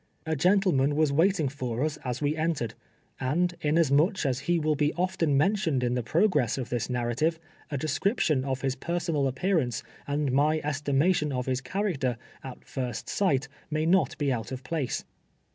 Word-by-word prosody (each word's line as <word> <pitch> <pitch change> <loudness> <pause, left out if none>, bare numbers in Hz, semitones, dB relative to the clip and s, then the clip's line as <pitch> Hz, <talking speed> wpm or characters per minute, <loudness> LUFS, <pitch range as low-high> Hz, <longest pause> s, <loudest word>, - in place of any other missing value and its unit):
A 160 0 0
gentleman 175 -4 +3
was 155 -2 +2
waiting 165 0 +3
lor 125 +1 -1
us 155 0 -2
a8 125 0 -4
we 145 +1 +1
entered, 155 -8 -1 0.5
and 170 +7 +1
inasmuch 155 +4 +3
as 130 -2 +1
he 175 - +4
will 155 -1 +1
be 150 0 +1
often 175 -5 +1
men 190 +9 +4
tioned 155 -10 0
in 120 0 +1
the 125 - 0
progress 155 - +2
of 130 -2 -4
this 120 0 -2
narrative, 125 +7 0 0.3
a 145 - -2
description 155 - +1
of 130 -1 -2
his 135 -1 0
personal 165 -1 -1
appearance, 135 - 0 0.2
and 145 -1 0
my 150 +4 +3
estimation 150 +2 +1
of 125 -2 -2
his 130 -1 -1
character, 135 - -1 0.3
at 130 -2 -9
first 125 -5 -4
sight, 150 -8 +1 0.2
may 155 0 0
not 185 +3 +2
be 145 -4 +1
out 115 +1 -4
of 130 0 -5
place. 145 -2 -2
145 Hz, 175 wpm, -28 LUFS, 130-165 Hz, 0.5 s, he